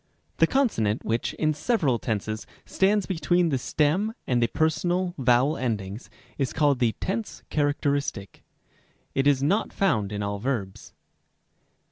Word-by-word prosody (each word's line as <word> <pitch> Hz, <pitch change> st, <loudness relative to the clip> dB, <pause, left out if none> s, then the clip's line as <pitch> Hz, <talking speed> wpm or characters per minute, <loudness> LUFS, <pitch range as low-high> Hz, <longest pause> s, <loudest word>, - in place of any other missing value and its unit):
a. -, -, -42 dB
The -, -, +6 dB
consonant 160 Hz, -, +1 dB
which, 115 Hz, +1 st, -1 dB
in 155 Hz, -1 st, +1 dB
several 150 Hz, -, +1 dB
tenses, 110 Hz, -1 st, -3 dB, 0.2 s
stands 200 Hz, 0 st, +2 dB
between 175 Hz, -1 st, +1 dB
the 135 Hz, -4 st, 0 dB
stem 160 Hz, -, 0 dB
and 125 Hz, -2 st, +1 dB
the 115 Hz, -, +3 dB
personal 175 Hz, +6 st, 0 dB
vowel 130 Hz, +4 st, +3 dB
endings, 105 Hz, -3 st, -3 dB, 0.3 s
is 135 Hz, -3 st, -1 dB
called 145 Hz, -4 st, +2 dB
the 120 Hz, -3 st, +2 dB
tense 210 Hz, +3 st, -4 dB
characteristic. 145 Hz, -, -1 dB, 0.7 s
It 135 Hz, +1 st, +1 dB
is 140 Hz, -2 st, +3 dB
not 195 Hz, +10 st, +1 dB
found 110 Hz, -, +1 dB
in 105 Hz, 0 st, -3 dB
all 100 Hz, 0 st, -3 dB
verbs. 110 Hz, -5 st, -4 dB
140 Hz, 140 wpm, -26 LUFS, 115-175 Hz, 0.7 s, The